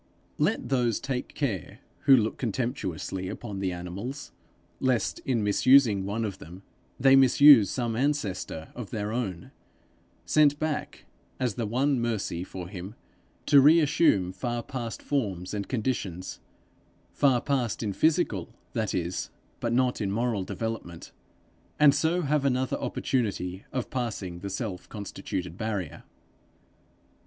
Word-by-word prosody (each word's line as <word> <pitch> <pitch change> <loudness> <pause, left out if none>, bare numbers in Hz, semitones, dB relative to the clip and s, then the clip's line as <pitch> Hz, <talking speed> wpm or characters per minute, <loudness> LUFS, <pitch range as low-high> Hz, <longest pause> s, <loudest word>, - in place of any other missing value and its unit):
Let - - 0
those 120 -5 +1
take 130 -2 -4
care 120 - -3 0.3
who 135 -2 +8
look 110 -2 -1
contemptuously 95 - -3
upon 105 -3 -6
the 95 -1 -1
animals, 95 +11 -6 0.5
lest, 130 -3 0
in 120 -5 +1
misusing 105 -1 +4
one 110 +3 -2
of 100 -3 -5
them, 90 +5 -11 0.4
they 135 +1 +6
misuse 135 -4 +7
some 120 -3 -2
ancestor 115 - -2
of 120 -5 -7
their 105 -2 -3
own, 100 -8 -4 0.7
sent 145 -2 +4
back, 155 -1 -3 0.3
as 125 -4 0
the 115 -1 -3
one 130 +4 +1
mercy 105 -7 -2
for 90 -1 -7
him, 95 +2 -8 0.5
to 140 - +7
reassume 145 - +4
far 120 +4 -3
past 120 -4 -6
forms 100 -11 -2
and 100 -1 -4
conditions 105 -8 -3 0.7
far 135 -4 +3
past 125 -4 -1
in 105 -2 -2
physical, 150 - +1 0.2
that 110 -2 -1
is, 90 0 -2 0.3
but 115 - -1
not 125 0 +1
in 100 - -1
moral 115 -2 0
development 110 -5 -5 0.7
and 150 -2 +7
so 160 +5 +1
have 150 -2 +1
another 130 -1 +1
opportunity 100 -7 -2
of 130 -3 -3
passing 105 -8 -3
the 100 +2 -5
self 95 -1 -5
constituted 95 -4 -5
barrier. 105 -8 -3
115 Hz, 130 wpm, -27 LUFS, 95-130 Hz, 0.7 s, who